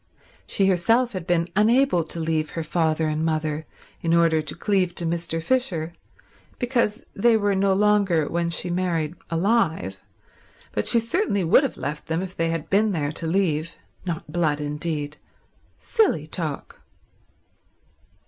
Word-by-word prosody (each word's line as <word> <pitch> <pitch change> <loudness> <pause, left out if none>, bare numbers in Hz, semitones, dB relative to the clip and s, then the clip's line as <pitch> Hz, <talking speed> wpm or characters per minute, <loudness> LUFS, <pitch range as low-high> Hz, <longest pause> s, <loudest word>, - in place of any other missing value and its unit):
She 195 - +2
herself 225 +7 +2
had 185 -3 -5
been 170 -2 +2
unable 225 -2 +3
to 165 - -3
leave 160 -1 -1
her 165 - -1
father 160 -1 0
and 155 +1 -1
mother 155 -1 -1 0.3
in 165 0 +2
order 165 -2 +3
to 155 - -5
cleave 185 -1 0
to 170 - -3
Mr. 165 0 -2
Fisher 175 -10 0 0.6
because 240 -3 0
they 225 +2 +4
were 205 -1 +1
no 195 0 +2
longer, 195 -6 +3
when 170 0 -1
she 175 +1 0
married, 170 -3 -1 0.2
alive, 165 - 0 0.7
but 105 - -2
she 235 - +5
certainly 230 - 0
would 165 +10 +5
have 275 - -3
left 150 +1 -5
them 165 +3 -1
if 185 -1 -7
they 165 0 0
had 165 -1 -3
been 205 +3 +2
there 145 -4 -1
to 160 +1 -4
leave. 165 -3 0 0.3
Not 170 -4 -5
blood, 155 -4 +1
indeed. 150 0 -2 0.6
Silly 425 - +1
talk. 155 -2 -5
170 Hz, 150 wpm, -24 LUFS, 160-200 Hz, 0.7 s, she